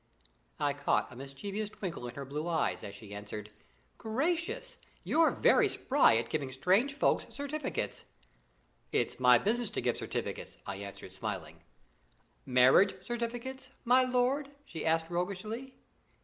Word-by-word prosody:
I 145 - +1
caught 145 -2 0
a - - -11
mischievous 195 - -5
twinkle 175 -11 -5
in 120 - -8
her 140 - -5
blue 150 +4 -4
eyes, 170 -2 0
as 100 - -7
she 105 0 -10
answered: 105 +1 -7 0.5
"Gracious! 335 - -1 0.2
you're 325 0 +4
very - - +4
spry 270 - +4
at 115 0 -1
giving 140 -4 -1
strange 190 - +3
folks - - +2
certificates." 285 - -4 0.9
"It's - - 0
my 125 -1 +7
business 230 - 0
to - - -3
give - - 0
certificates," - - -4
I 95 - -4
answered, 100 -2 -8
smiling. 95 -5 -5 0.9
"Marriage 130 +10 +6
certificates, 245 +2 -4 0.2
my 250 +2 +6
lord?" 255 +3 +1 0.2
she 165 - -4
asked 160 0 +2
roguishly. 205 +9 -3
185 Hz, 135 wpm, -32 LUFS, -, 0.9 s, my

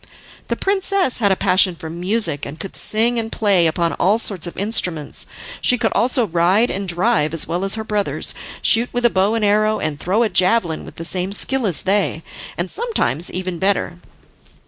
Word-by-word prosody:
The - - -1
princess 390 -7 0
had 200 -4 +2
a - - +3
passion 185 -1 +2
for 160 - -9
music, 175 -1 -1
and 155 - -7
could 195 - -8
sing 230 +2 +2
and 225 0 -5
play 195 -6 +3
upon 170 +1 -1
all 200 +5 +2
sorts 195 -6 0
of 175 - -9
instruments 180 -7 0 0.3
she 250 - +3
could - - 0
also 250 0 +2
ride 185 +6 +2
and 195 0 -4
drive 175 -3 +1
as 165 - +2
well 175 +3 -3
as 195 +1 +2
her 220 - -4
brothers, 210 -2 -1 0.3
shoot 235 +2 +4
with 245 0 -1
a 240 - +4
bow 195 +4 +1
and 225 -2 0
arrow, 215 +1 +2
and 145 -2 -3
throw 200 +9 +1
a 225 - 0
javelin 185 -2 +1
with - - -12
the 165 - -7
same 185 +3 -3
skill 260 +3 +1
as 175 - +2
they, 190 -4 0 0.3
and 175 +1 -2
sometimes 425 - -1
even 185 -1 -4
better. 190 -2 -1
195 Hz, 195 wpm, -19 LUFS, 175-225 Hz, 0.3 s, shoot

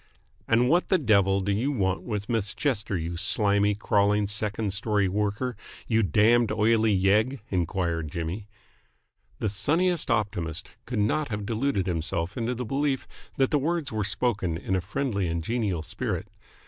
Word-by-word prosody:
"And 120 +2 +3
what 175 +6 +2
the 190 - +4
devil 100 - +3
do 100 +2 -1
you 115 +8 0
want 95 -8 0
with 105 -4 -4
Miss 110 -4 -1
Chester, 110 -8 0
you 85 +1 -4
slimy, 100 +2 +3
crawling 105 0 +2
second 105 0 0
story 105 -1 +1
worker, 105 +5 -1 0.3
you 115 -1 +2
damned, 110 +5 +3
oily 110 +1 +3
yegg?" 110 +8 +2
enquired 85 -3 -1
Jimmy. 85 +5 -4 0.9
The - - -1
sunniest 165 - +1
optimist 100 -8 -2 0.2
could 125 - -3
not 115 +9 +1
have 105 -4 -4
deluded 115 -2 0
himself 85 -1 -2
into 120 +1 -2
the 125 +1 -4
belief 135 +2 -1 0.3
that 135 -1 +2
the 150 - +3
words 165 +1 -1
were 110 -1 -1
spoken 100 -4 -1
in 95 +1 -2
a 95 - 0
friendly 100 -1 -2
and 85 0 -2
genial 100 -6 -1
spirit. - - -3
105 Hz, 160 wpm, -26 LUFS, 95-120 Hz, 0.9 s, the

